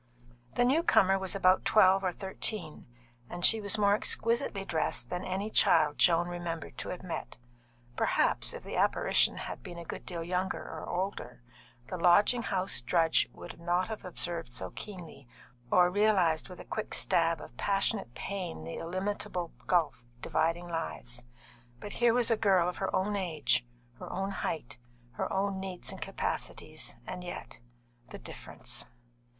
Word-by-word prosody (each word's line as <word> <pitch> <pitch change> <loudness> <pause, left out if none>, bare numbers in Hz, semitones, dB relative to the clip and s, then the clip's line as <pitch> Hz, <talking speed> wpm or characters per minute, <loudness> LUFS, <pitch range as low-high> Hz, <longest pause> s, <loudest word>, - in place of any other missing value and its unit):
The 245 - +3
new 280 +7 +4
comer 195 - +4
was 190 0 -1
about 185 -1 +4
twelve 195 -2 +5
or 185 - +1
thirteen, 190 -2 -2 0.4
and 175 0 0
she 225 -1 +7
was 205 +1 0
more 200 -1 +4
exquisitely 220 -2 +1
dressed 160 -4 -1
than 180 - -2
any 195 +3 -3
child 150 -7 +4
Joan 170 0 +5
remembered 175 -3 -5
to - - -4
have 180 - -6
met. 180 - -5 0.6
Perhaps, - - +2
if - - -7
the - - -6
apparition - - +3
had - - -6
been 175 - -9
a 170 - -7
good - - -6
deal 170 -2 -5
younger 180 +2 -1
or 160 - -7
older, 180 - -4 0.4
the 185 - -5
lodging 205 +8 +5
house 190 - +1
drudge 165 +5 +2
would - - -10
not 175 +2 0
have 220 - -5
observed 170 -7 -2
so 95 -1 -2
keenly, 175 - -9 0.4
or 180 +4 +5
realised 190 -6 +3
with 180 - -10
a - - -9
quick 215 - -4
stab 165 -1 +2
of 120 - -11
passionate 195 - 0
pain 185 - -5
the 80 +1 -6
illimitable 180 0 -3
gulf 150 -9 +1
dividing 165 +5 0
lives. 125 -7 -2 0.5
But 205 - -7
here 240 -1 +3
was 245 -1 +3
a - - +5
girl 190 -5 +3
of 180 - -3
her 190 - -1
own 205 +2 0
age, 160 - +1 0.3
her - - -7
own 195 +1 -2
height, 155 -9 -4 0.3
her - - -3
own 195 0 0
needs 190 -2 -4
and - - -9
capacities, - - -4
and 180 - -6
yet 175 - -7 0.5
the - - -8
difference! - - -6
180 Hz, 160 wpm, -31 LUFS, 165-200 Hz, 0.6 s, she